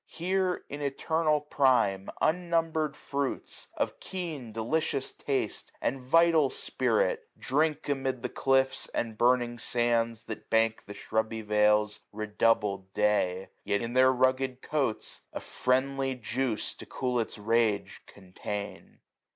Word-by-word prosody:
Here, 185 Hz, +1 st, -1 dB
in 145 Hz, +1 st, -6 dB
eternal 150 Hz, +2 st, +1 dB
prime, 125 Hz, -10 st, +2 dB
UnnumberM 165 Hz, -3 st, +1 dB
fruits, 140 Hz, -1 st, -4 dB
of -, -, -1 dB
keen 160 Hz, -11 st, -5 dB
delicious 135 Hz, +5 st, -1 dB
taste 135 Hz, -6 st, -3 dB
And 135 Hz, -, -1 dB
vital 160 Hz, +2 st, +4 dB
spirit, -, -, 0 dB
drink 150 Hz, +3 st, 0 dB
amid 135 Hz, -3 st, -1 dB
the -, -, 0 dB
cliffs. 135 Hz, 0 st, +1 dB
And 115 Hz, -2 st, -1 dB
burning 120 Hz, 0 st, +2 dB
sands 115 Hz, -2 st, 0 dB
that 110 Hz, -, -8 dB
bank 115 Hz, 0 st, +2 dB
the 100 Hz, -, -8 dB
shrubby 110 Hz, 0 st, -2 dB
vales, 105 Hz, 0 st, +3 dB, 0.2 s
660 -, -, -13 dB
Redoubled 105 Hz, -3 st, +1 dB
day; 95 Hz, -3 st, +1 dB
yet 100 Hz, +2 st, 0 dB
in 115 Hz, +1 st, -4 dB
their 130 Hz, +1 st, +6 dB
rugged 130 Hz, 0 st, +1 dB
coats 135 Hz, -8 st, -2 dB
A -, -, -3 dB
friendly 135 Hz, +1 st, 0 dB
juice 125 Hz, -1 st, -2 dB
to -, -, -12 dB
cool 125 Hz, -1 st, -1 dB
its 115 Hz, -, -3 dB
rage 110 Hz, -1 st, +1 dB
contain. 100 Hz, +1 st, -7 dB
125 Hz, 125 wpm, -29 LUFS, 110-145 Hz, 0.2 s, their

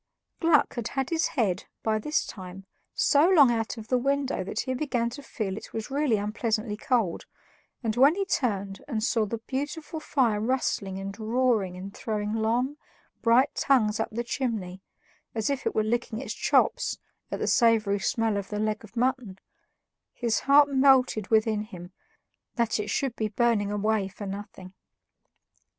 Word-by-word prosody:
Gluck 325 Hz, -3 st, +3 dB
had 235 Hz, -3 st, -3 dB
had 270 Hz, +1 st, -3 dB
his 330 Hz, 0 st, +2 dB
head, 195 Hz, -6 st, +1 dB, 0.2 s
by 215 Hz, -1 st, +1 dB
this 300 Hz, +8 st, 0 dB
time, 190 Hz, -1 st, -9 dB, 0.3 s
so 295 Hz, +5 st, +4 dB
long 290 Hz, -9 st, +6 dB
out 225 Hz, +1 st, -2 dB
of 220 Hz, -1 st, -8 dB
the 255 Hz, -, +3 dB
window 275 Hz, -4 st, 0 dB
that 200 Hz, +3 st, -3 dB
he 260 Hz, -, -3 dB
began 245 Hz, -4 st, -1 dB
to 280 Hz, +4 st, -8 dB
feel 210 Hz, -8 st, -4 dB
it -, -, -10 dB
was 225 Hz, +3 st, -5 dB
really 280 Hz, -5 st, +2 dB
unpleasantly 215 Hz, +1 st, -1 dB
cold, 220 Hz, -5 st, -1 dB, 0.6 s
and 220 Hz, -2 st, -1 dB
when 275 Hz, +6 st, +5 dB
he 395 Hz, 0 st, -1 dB
turned 200 Hz, -, -2 dB
and 225 Hz, -6 st, -2 dB
saw 225 Hz, -2 st, +1 dB
the 230 Hz, -, -3 dB
beautiful 290 Hz, +7 st, -5 dB
fire 245 Hz, -8 st, +1 dB
rustling 220 Hz, -5 st, -1 dB
and 195 Hz, +2 st, -6 dB
roaring 220 Hz, -5 st, +1 dB
and 195 Hz, +2 st, -8 dB
throwing 210 Hz, -1 st, -3 dB
long, 235 Hz, +6 st, 0 dB, 0.4 s
bright 250 Hz, +4 st, +4 dB
tongues 225 Hz, -6 st, +2 dB
up 225 Hz, -, -1 dB
the 235 Hz, +2 st, -3 dB
chimney, 215 Hz, -8 st, -3 dB, 0.5 s
as 220 Hz, +4 st, 0 dB
if 275 Hz, -1 st, -2 dB
it -, -, -2 dB
were 215 Hz, -, +2 dB
licking 230 Hz, 0 st, -1 dB
its 240 Hz, -2 st, -4 dB
chops -, -, +1 dB, 0.3 s
at -, -, -3 dB
the -, -, -2 dB
savory 225 Hz, -4 st, +3 dB
smell 225 Hz, -3 st, 0 dB
of 200 Hz, -1 st, -4 dB
the 210 Hz, -, -3 dB
leg 215 Hz, +1 st, -1 dB
of 215 Hz, +2 st, -14 dB
mutton, 250 Hz, -5 st, 0 dB, 0.8 s
his 235 Hz, -2 st, 0 dB
heart 285 Hz, +1 st, +7 dB
melted 265 Hz, -6 st, +3 dB
within 220 Hz, -1 st, +2 dB
him 180 Hz, -4 st, -9 dB, 0.6 s
that 235 Hz, -2 st, 0 dB
it 210 Hz, 0 st, -3 dB
should 255 Hz, +3 st, -1 dB
be 215 Hz, -, -1 dB
burning 215 Hz, -1 st, +1 dB
away 210 Hz, -1 st, 0 dB
for 205 Hz, +1 st, -9 dB
nothing. 195 Hz, -1 st, -8 dB
225 Hz, 170 wpm, -27 LUFS, 210-260 Hz, 0.8 s, heart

